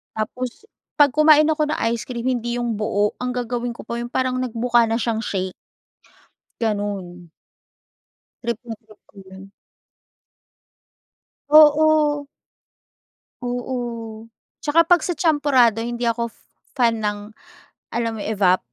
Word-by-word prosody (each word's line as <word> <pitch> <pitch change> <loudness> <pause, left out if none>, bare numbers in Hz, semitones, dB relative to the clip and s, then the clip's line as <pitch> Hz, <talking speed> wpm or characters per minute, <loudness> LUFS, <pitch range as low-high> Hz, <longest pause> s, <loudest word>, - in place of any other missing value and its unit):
Tapos, 245 - -4 0.3
'pag 290 -2 +5
kumain 305 +1 +6
ako 310 -1 +1
ng 300 - -1 0.2
ice 235 -1 -4
cream 235 -2 -5
hindi 240 -2 -1
yung 240 -3 -2
buo 210 -1 +1
ang 250 0 -3
gagawin 245 -1 -3
ko - - -10
pa 235 +1 -5
yung 240 - -4
parang 255 +1 -1
nagmukha 240 -1 +1
na 225 - 0
siyang 230 -1 -1
shake. 190 -4 -3 1.1
Gano'n. 200 -5 -3 1.1
Trip 235 -1 -2
na 225 - -5
trip 215 -1 -19
ko - - -28
'yun. 190 +1 -13 2.0
Oo. 300 -1 +5 1.2
Oo, 240 -3 -5 0.4
'tsaka 325 +2 +3
'pag 350 -1 +5
sa - - -1
champorado 270 - +3
hindi 240 0 -3
ako 235 0 -1 0.5
fan 230 -4 +2
ng 205 0 -1 0.8
alam 230 -1 0
mo - - -5
evap 195 -4 +2
235 Hz, 125 wpm, -21 LUFS, 220-260 Hz, 2.0 s, kumain